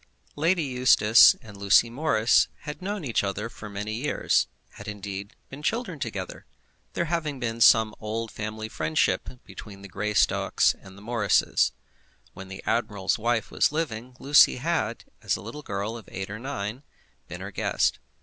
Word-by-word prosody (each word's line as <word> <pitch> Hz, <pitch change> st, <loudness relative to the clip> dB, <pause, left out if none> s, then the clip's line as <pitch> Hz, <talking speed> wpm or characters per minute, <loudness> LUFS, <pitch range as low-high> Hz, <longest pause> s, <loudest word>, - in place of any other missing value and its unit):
Lady 165 Hz, +3 st, +2 dB
Eustace 125 Hz, -4 st, +6 dB
and 110 Hz, -2 st, -12 dB
Lucy 100 Hz, +4 st, +4 dB
Morris 120 Hz, -3 st, +3 dB
had 150 Hz, +4 st, -7 dB
known 200 Hz, -2 st, -4 dB
each 120 Hz, -5 st, 0 dB
other 100 Hz, +3 st, -3 dB
for 105 Hz, -2 st, -10 dB
many 105 Hz, +2 st, -4 dB
years, 125 Hz, +7 st, +1 dB, 0.2 s
had -, -, -12 dB
indeed 100 Hz, -1 st, -6 dB
been 135 Hz, +2 st, -9 dB
children 190 Hz, -, -2 dB
together, 105 Hz, -8 st, -6 dB, 0.5 s
there 170 Hz, -, -1 dB
having 155 Hz, -4 st, -2 dB
been 115 Hz, -1 st, -3 dB
some 110 Hz, -2 st, +6 dB
old 110 Hz, +1 st, -4 dB
family 110 Hz, 0 st, -5 dB
friendship 80 Hz, -7 st, 0 dB, 0.2 s
between 100 Hz, -2 st, -11 dB
the -, -, -8 dB
Greystocks 105 Hz, +3 st, +2 dB
and 95 Hz, 0 st, -14 dB
the 100 Hz, -, -13 dB
Morrises. 115 Hz, -3 st, +2 dB, 0.6 s
When 95 Hz, -, -10 dB
the 95 Hz, +1 st, -9 dB
admiral's 105 Hz, -4 st, 0 dB
wife 115 Hz, -1 st, 0 dB
was -, -, +2 dB
living, 130 Hz, -6 st, -4 dB
Lucy 145 Hz, +1 st, +6 dB
had, 130 Hz, -4 st, -2 dB, 0.2 s
as -, -, 0 dB
a -, -, -7 dB
little 150 Hz, -, -8 dB
girl 100 Hz, -2 st, -4 dB
of 115 Hz, -4 st, -11 dB
eight 95 Hz, +1 st, -5 dB
or 110 Hz, -, -6 dB
nine, 120 Hz, -2 st, -5 dB, 0.5 s
been -, -, -8 dB
her -, -, -6 dB
guest. -, -, 0 dB
110 Hz, 160 wpm, -26 LUFS, 105-135 Hz, 0.6 s, Eustace